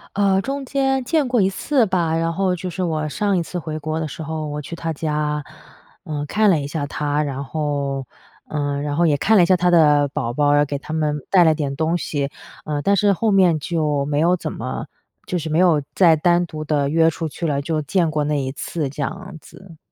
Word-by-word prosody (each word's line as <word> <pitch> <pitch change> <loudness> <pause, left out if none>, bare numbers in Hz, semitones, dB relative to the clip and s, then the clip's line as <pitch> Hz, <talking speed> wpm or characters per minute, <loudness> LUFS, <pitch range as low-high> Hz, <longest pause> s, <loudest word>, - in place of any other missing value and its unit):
呃， 195 -1 +3
中 275 +4 -4
间 270 -1 0
见 310 +1 +1
过 245 -3 +3
1 190 - +3
次 250 +6 +1
吧， 170 -4 0
然 165 0 0
后 190 +1 +1
就 180 +1 -4
是 185 +1 -3
我 155 -3 -1
上 200 +5 0
一 - - +1
次 180 - -6
回 155 -1 -5
国 155 +1 -3
的 160 -1 -3
时 160 - -8
候， 160 0 -4
我 150 0 -4
去 150 +4 -7
她 165 -1 -3
家， 150 -1 -2 0.6
呃， 150 -5 -4
看 210 +7 +2
了 170 -5 +3
一 140 - -4
下 145 0 -3
她， 145 +1 -1
然 140 -2 -4
后， 140 -3 -2 0.4
呃， 145 -1 -2
然 145 0 -3
后 170 - +3
也 155 -3 +3
看 215 +9 +3
了 180 - +6
一 - - +5
下 185 - +4
她 180 0 +2
的 150 -4 +5
宝 135 -5 -3
宝， 145 +1 +3
给 145 0 -3
她 145 - -9
们 155 -2 0
带 180 -3 +5
了 160 -1 +4
点 145 -3 -2
东 160 +2 +1
西， 145 -4 -2 0.4
呃， 150 -1 -2
但 200 - +2
是 200 0 +4
后 215 +4 0
面 185 -5 +4
就 150 -2 0
没 145 0 -1
有 170 +3 +3
怎 180 - -5
么 - - -5 0.4
就 180 - -2
是 160 -1 -4
没 155 +2 +1
有 170 -5 +4
再 170 -4 +5
单 175 +2 +2
独 155 -2 -7
地 145 -2 0
约 160 +2 +4
出 165 0 -4
去 165 +3 -4
了， 140 -2 0
就 155 +1 -1
见 165 +2 0
过 150 -1 0
那 150 +1 0
1 130 - -3
次， 145 +1 -4
这 145 +2 -7
样 190 +4 -5
子。 175 0 -15
160 Hz, 245 characters per minute, -21 LUFS, 145-180 Hz, 0.6 s, 了